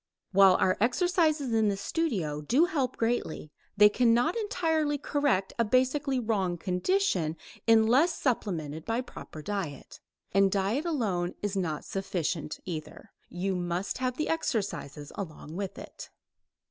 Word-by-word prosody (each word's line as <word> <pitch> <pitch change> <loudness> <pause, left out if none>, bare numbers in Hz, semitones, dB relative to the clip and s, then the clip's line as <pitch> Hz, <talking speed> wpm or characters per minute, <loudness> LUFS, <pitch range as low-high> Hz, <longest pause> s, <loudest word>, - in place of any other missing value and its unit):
While 195 -1 +7
our 185 0 +2
exercises 310 - +2
in 220 -1 +3
the 200 - -1
studio 195 - -2
do 255 - +3
help 275 -7 -1
greatly, 225 -10 -2 0.3
they 210 0 +9
cannot 240 +7 +3
entirely 320 -9 0
correct 285 -9 0
a - - +5
basically 260 +4 +1
wrong 200 -7 0
condition 180 - 0 0.3
unless 235 +9 +4
supplemented 160 - -2
by 230 +5 -1
proper 155 -10 -10
diet. 195 -8 -5 0.3
And 195 0 +4
diet 205 - 0
alone 200 - -1
is 205 -1 -1
not 165 -6 -2
sufficient, 180 -5 -3
either; 160 -4 -7 0.2
you 190 +2 -2
must 175 +4 -2
have 255 -1 -1
the 310 - -1
exercises 200 - -2
along 160 -4 -7
with 195 0 -4
it. - - -10
210 Hz, 135 wpm, -29 LUFS, 180-265 Hz, 0.3 s, they